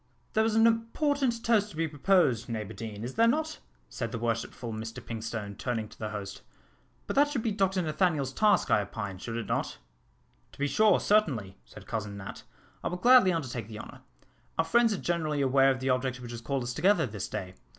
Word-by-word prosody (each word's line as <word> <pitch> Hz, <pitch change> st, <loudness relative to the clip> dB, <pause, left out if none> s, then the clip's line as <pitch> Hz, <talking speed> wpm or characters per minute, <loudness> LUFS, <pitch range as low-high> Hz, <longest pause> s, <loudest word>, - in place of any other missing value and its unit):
"There 220 Hz, -, +3 dB
is 220 Hz, -1 st, +1 dB
an 225 Hz, 0 st, +6 dB
important 235 Hz, +2 st, +1 dB
toast 215 Hz, -3 st, +3 dB
to 175 Hz, -, -12 dB
be 165 Hz, +1 st, 0 dB
proposed, 145 Hz, -, +2 dB
Neighbour 110 Hz, -2 st, -4 dB
Deane, 110 Hz, -2 st, -7 dB
is 125 Hz, +2 st, -5 dB
there 230 Hz, -, +4 dB
not?" 310 Hz, +5 st, 0 dB, 0.3 s
said -, -, -4 dB
the -, -, -3 dB
Worshipful 115 Hz, 0 st, -3 dB
Mr 115 Hz, +3 st, -6 dB
Pinkstone, 110 Hz, -3 st, -5 dB
turning 115 Hz, -2 st, -3 dB
to -, -, -17 dB
the 110 Hz, -, -3 dB
host; 100 Hz, -2 st, -6 dB, 0.6 s
"but -, -, -4 dB
that 290 Hz, +1 st, +5 dB
should 260 Hz, -6 st, -2 dB
be 225 Hz, -, 0 dB
Dr 190 Hz, -2 st, +1 dB
Nathaniel's 155 Hz, -4 st, 0 dB
task, 210 Hz, +7 st, +3 dB
I 105 Hz, -, +5 dB
opine, 100 Hz, -2 st, -5 dB
should 115 Hz, +3 st, -5 dB
it 115 Hz, -, -3 dB
not?" -, -, -2 dB, 0.8 s
"To -, -, -16 dB
be 145 Hz, -, 0 dB
sure, 215 Hz, +4 st, +4 dB
certainly," 135 Hz, -, +1 dB
said -, -, -13 dB
Cousin 105 Hz, -2 st, -4 dB
Nat, 95 Hz, -1 st, -8 dB, 0.4 s
"I -, -, -1 dB
will 180 Hz, -, -3 dB
gladly 245 Hz, -1 st, +6 dB
undertake 130 Hz, -, -3 dB
the 110 Hz, -1 st, -8 dB
honour. -, -, -10 dB, 0.6 s
Our 165 Hz, -, +2 dB
friends 235 Hz, +4 st, +4 dB
are 205 Hz, -, 0 dB
generally 155 Hz, -5 st, -1 dB
aware 135 Hz, 0 st, +4 dB
of 130 Hz, -2 st, 0 dB
the 130 Hz, 0 st, +1 dB
object 130 Hz, 0 st, -1 dB
which 120 Hz, -1 st, -8 dB
has 120 Hz, -1 st, -6 dB
called 135 Hz, +1 st, -2 dB
us 120 Hz, 0 st, -3 dB
together 190 Hz, -, +3 dB
this 105 Hz, -5 st, -5 dB
day. 90 Hz, -1 st, -5 dB
135 Hz, 210 wpm, -29 LUFS, -, 0.8 s, an